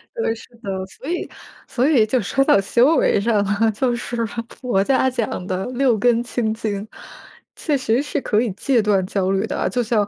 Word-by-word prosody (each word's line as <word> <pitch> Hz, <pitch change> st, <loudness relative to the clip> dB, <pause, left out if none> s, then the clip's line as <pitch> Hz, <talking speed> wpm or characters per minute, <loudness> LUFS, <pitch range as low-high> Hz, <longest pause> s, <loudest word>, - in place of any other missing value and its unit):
对， 455 Hz, -, 0 dB
是 225 Hz, -, -12 dB, 0.2 s
的。 190 Hz, -1 st, -3 dB
所 265 Hz, -, -10 dB
以 350 Hz, -, -3 dB, 0.4 s
所 265 Hz, +4 st, +1 dB
以 235 Hz, -8 st, +4 dB
就 240 Hz, +2 st, 0 dB
说 270 Hz, +7 st, 0 dB
到 200 Hz, -, +5 dB
修 245 Hz, +10 st, +3 dB
为 -, -, +3 dB
上 210 Hz, -1 st, +1 dB
了， 205 Hz, +3 st, +1 dB
就 245 Hz, +3 st, 0 dB
是 240 Hz, -1 st, -3 dB
佛 230 Hz, -1 st, -3 dB
家 260 Hz, +2 st, +2 dB
讲 230 Hz, -7 st, -3 dB
的 185 Hz, 0 st, -3 dB
六 250 Hz, -2 st, +1 dB
根 235 Hz, +2 st, +2 dB
清 230 Hz, -3 st, -1 dB
净， 215 Hz, -2 st, -4 dB, 0.7 s
确 295 Hz, -3 st, -1 dB
实 250 Hz, 0 st, +1 dB
是 290 Hz, -1 st, -3 dB
可 210 Hz, -, +1 dB
以 235 Hz, -1 st, 0 dB
戒 245 Hz, +3 st, +1 dB
断 200 Hz, -3 st, +1 dB
焦 190 Hz, 0 st, -1 dB
虑 195 Hz, 0 st, +1 dB
的 -, -, -4 dB
啊。 -, -, 0 dB
就 245 Hz, -1 st, 0 dB
像 215 Hz, -2 st, +1 dB
230 Hz, 220 characters per minute, -21 LUFS, 205-250 Hz, 0.7 s, 到